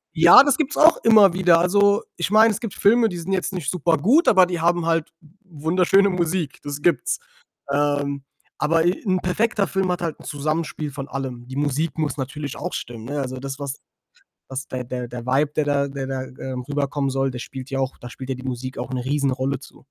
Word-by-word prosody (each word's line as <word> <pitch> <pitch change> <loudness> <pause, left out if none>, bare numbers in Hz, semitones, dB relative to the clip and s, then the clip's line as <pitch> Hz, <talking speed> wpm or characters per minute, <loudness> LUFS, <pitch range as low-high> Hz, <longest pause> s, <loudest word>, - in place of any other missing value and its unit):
Ja, 170 - +8
das 285 -3 +2
gibt's 300 -2 -1
auch 320 +2 +6
immer 215 -5 +6
wieder. 175 -2 +4
Also, 200 +3 +3 0.2
ich 175 +3 -2
meine, 220 +1 +6
es 205 - -3
gibt 230 -5 -5
Filme, 225 +2 +3
die 175 - -6
sind 170 +3 -5
jetzt 190 +1 -1
nicht 170 -7 -3
super 170 -2 +1
gut, 265 - +3
aber 185 -3 +6
die 175 -2 -3
haben 170 0 +1
halt 165 -1 0 0.3
wunderschöne 180 +4 +2
Musik, 175 -4 -2
das 145 0 -5
gibt's. 155 -7 +1 0.5
Ähm. 145 -1 0 0.4
Aber 165 +1 +2
e 175 - +3
'n 185 -2 +1
perfekter 205 +2 0
Film 190 -1 -1
hat 180 0 -1
halt 165 -3 -3
'n - - -14
Zusammenspiel 155 0 -3
von 140 -1 -7
allem. 130 -3 -6
Die 130 - -8
Musik 145 +3 -1
muss 155 -2 -2
natürlich 140 +1 -5
auch - - -5
stimmen, 115 -1 -6
ne? 145 +2 -3
Also 130 -1 -5
das, 135 0 -6
was 140 -1 -5 0.7
was 130 -1 -6
der 130 -1 -4
der 125 0 -5
der 120 0 -8
vibe, 140 +3 +2
der 155 - +2
da 140 -1 +1
der 135 -1 -5
da, 130 -1 -3
ähm, 130 -1 -7
rüberkommen 140 -1 -1
soll, 135 0 0
der 125 - -6
spielt 130 +2 -8
ja 135 - -3
auch 130 0 -2
da 120 - -9
spielt 130 +1 -9
ja - - -1
die 130 - -10
Musik 130 0 -5
auch - - -5
'ne 130 -1 -4
Riesenrolle 135 -1 -1
zu. 135 - -16
145 Hz, 220 wpm, -22 LUFS, 135-180 Hz, 0.7 s, Ja